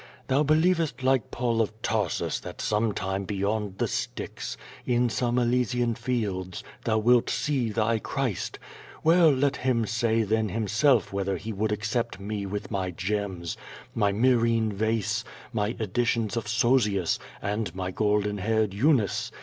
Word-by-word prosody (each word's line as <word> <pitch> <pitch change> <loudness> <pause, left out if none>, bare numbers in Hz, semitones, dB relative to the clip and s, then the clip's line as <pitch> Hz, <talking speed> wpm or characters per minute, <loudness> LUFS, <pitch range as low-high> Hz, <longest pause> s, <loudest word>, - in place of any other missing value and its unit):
Thou 135 +2 +3
believest, 155 -3 +2
like 130 -3 +2
PauiAof 115 -3 0
Tarsus, 105 -7 0
that - - -9
some 110 +1 +1
time 95 0 -2
beyond 100 0 -2
the - - 0
Styx, - - -4 0.3
in 125 0 +2
some 120 +2 0
Elysian 125 0 +1
fields, 105 -7 -3 0.2
thou 110 -2 +2
wilt 120 +2 +4
sue 125 -1 0
thy 110 +1 +1
Clirist. 125 - -2 0.5
Well, 165 0 +6
let 140 0 +2
Him 125 -3 +1
say 110 +1 +1
then 110 +1 +1
Himself 110 +5 +2
whether 100 -1 -1
He 110 +5 -5
would 105 +2 -1
accept 110 +3 -2
me 100 0 -4
with 105 +3 -5
my 95 -3 -1
gems, 95 -2 -3 0.4
my 105 -3 +2
Myrrliene 115 -1 +2
vase, 110 +1 0 0.3
my 105 -1 0
edi 110 +2 0
tions 115 -1 0
of 115 -2 -3
Sozius, 110 -5 +2 0.2
and 105 -2 -2
my 95 0 -3
golden 105 0 +1
haired 110 0 +1
Eunice. 110 -3 +2
110 Hz, 145 wpm, -27 LUFS, 100-120 Hz, 0.5 s, Well